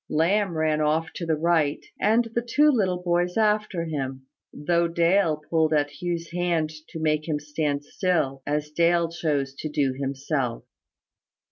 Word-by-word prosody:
Lamb 175 +3 +1
ran 155 -1 +1
off 155 +2 0
to 170 - -5
the 160 - +2
right, 155 -2 +1
and 225 +3 +3
the 235 - +1
two 290 +6 +3
little 185 -8 0
boys 175 +1 0
after 210 -5 +1
him, 135 -4 -4 0.3
though 170 +3 +1
Dale 170 -1 +2
pulled 160 -1 +2
at 145 -1 0
Hugh's 170 -1 -3
hand 170 -3 0 0.2
to 165 - -7
make 155 0 0
him 150 -2 -1
stand 150 -1 -2
still, 145 -7 -1
as 150 0 -1
Dale 170 +1 +2
chose 145 -5 -1
to 155 - -4
do 140 -3 0
himself. 135 -2 -2
160 Hz, 155 wpm, -25 LUFS, 150-175 Hz, 0.3 s, and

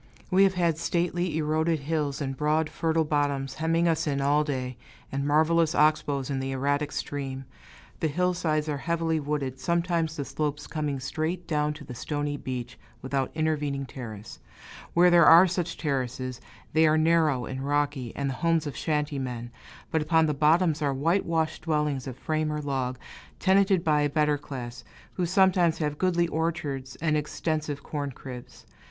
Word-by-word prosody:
We 190 +2 +6
have 190 -1 +1
had 170 -3 +1
stately, 175 -1 0
eroded 155 0 +1
hills, 150 -1 -2
and 135 -1 -2
broad, 155 +2 +1
fertile 160 0 +1
bottoms, 145 -3 0
hemming 165 +2 +1
us 160 -1 +1
in 140 -2 0
all 145 +2 +3
day, 130 -4 -3 0.4
and 140 +1 -2
marvelous 160 +2 +3
ox 155 0 +4
bows 140 -1 -3
in 135 - -1
the 135 0 -3
erratic 145 +2 0
stream. 135 -2 -4 0.5
The 160 - +1
hillsides 160 -1 0
are 145 -2 -2
heavily 165 0 0
wooded, 140 -3 -3
sometimes 170 +1 0
the 140 - -3
slopes 150 0 -3
coming 150 -3 -3
straight 160 +6 -3
down 150 -2 0
to - - -11
the 125 - -8
stony 145 +3 -3
beach, 125 -3 -6 0.2
without 135 0 -1
intervening 150 -3 -1
terrace; 110 -5 -9 0.6
where 175 +1 +6
there 170 -2 +7
are 170 +3 +9
such 175 -2 -2
terraces, 130 -3 -3 0.3
they 160 +1 +5
are 155 0 +4
narrow 155 -5 +3
and 130 0 -5
rocky, 145 -4 -1
and 140 - -2
the 135 - -1
homes 165 -2 +2
of 145 -4 -5
shanty 150 -1 -1
men; 120 -2 -5 0.4
but 160 - +1
upon 160 +1 +3
the 150 - +1
bottoms 155 +2 +3
are 140 -2 +1
whitewashed 165 +1 0
dwellings 150 -4 -1
of 130 -1 -6
frame 155 +1 -1
or 150 - -2
log, 135 -3 -2 0.4
tenanted 195 -2 +3
by 150 -2 +3
a 145 - +2
better 150 0 +1
class, 120 -4 -7 0.3
who 180 -2 -1
sometimes 180 -2 +3
have 150 -2 -2
goodly 175 -2 +2
orchards 145 -5 -2
and 160 -2 +2
extensive 150 -1 -2
corn 145 -2 -4
cribs. 125 -1 -10
150 Hz, 170 wpm, -27 LUFS, 140-165 Hz, 0.6 s, are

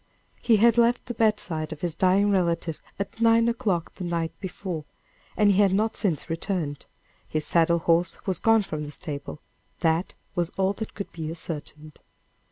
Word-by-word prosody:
He 230 - +4
had 235 +2 +5
left 235 +1 +3
the 240 - -4
bedside 205 -8 0
of 155 - -7
his 175 -2 -1
dying 190 +4 +3
relative 170 -4 0 0.2
at 200 +3 -5
nine 230 0 +5
o'clock 220 -8 -1
the 185 - -7
night 170 -2 -1
before, 180 -4 -5 0.5
and 205 -1 +5
he 200 +1 +4
had 195 -2 +4
not 215 +3 +1
since 175 -8 -1
returned 165 -3 -3 0.4
his 155 -1 -1
saddle 170 0 +4
horse 170 +1 +2
was 190 -3 -1
gone 225 -1 +4
from 155 -5 -4
the 145 - -7
stable 150 -2 -6 0.4
that 165 +2 +1 0.2
was 175 -2 0
all 195 +1 +2
that 220 +2 -7
could 200 - -6
be 160 -2 -5
ascertained. 155 -2 -7
180 Hz, 175 wpm, -26 LUFS, 160-205 Hz, 0.5 s, had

